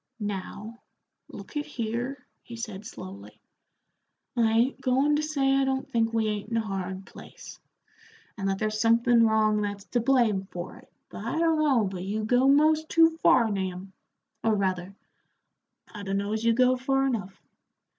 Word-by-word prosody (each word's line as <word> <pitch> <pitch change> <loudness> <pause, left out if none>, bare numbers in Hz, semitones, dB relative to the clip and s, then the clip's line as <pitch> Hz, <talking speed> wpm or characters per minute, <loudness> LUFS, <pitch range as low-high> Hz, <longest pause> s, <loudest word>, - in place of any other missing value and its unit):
"Now, 210 +2 -6 0.5
look - - -11
at 295 - -3
here," 245 +3 -4 0.2
he 235 - -10
said, 215 -3 -7
slowly, 100 - -10 1.0
"I 230 -2 +3
ain't 245 +4 +1
goin' 270 +3 +2
to - - 0
say 280 -3 +1
I 275 0 +3
don't 265 0 -1
think 225 -1 0
we 225 -1 0
ain't 210 0 -3
in 230 - -1
a - - +2
hard 190 -2 -5
place, - - -12 0.8
and 195 -2 -2
that 195 - -1
there's 215 +1 -2
somethin' 230 0 +4
wrong 215 -1 +2
that's 205 -1 -4
to 240 - +2
blame 230 -6 +2
for 175 0 -7
it, - - -19 0.2
but - - -8
I - - -3
dunno 310 -7 +3
but 190 -2 -4
you 210 +3 -3
go 245 +3 +3
most 310 +3 +4
too 330 0 +5
far, 230 -8 +4
Nahum; 190 -1 -4 0.5
or, 225 -1 +2
rather, 190 -1 -2 1.0
I 210 - -7
dunno 200 +1 -2
as 220 0 -2
you 230 0 +4
go 255 +2 +3
far 270 +1 +1
enough. 205 -8 -3
225 Hz, 165 wpm, -27 LUFS, 200-260 Hz, 1.0 s, too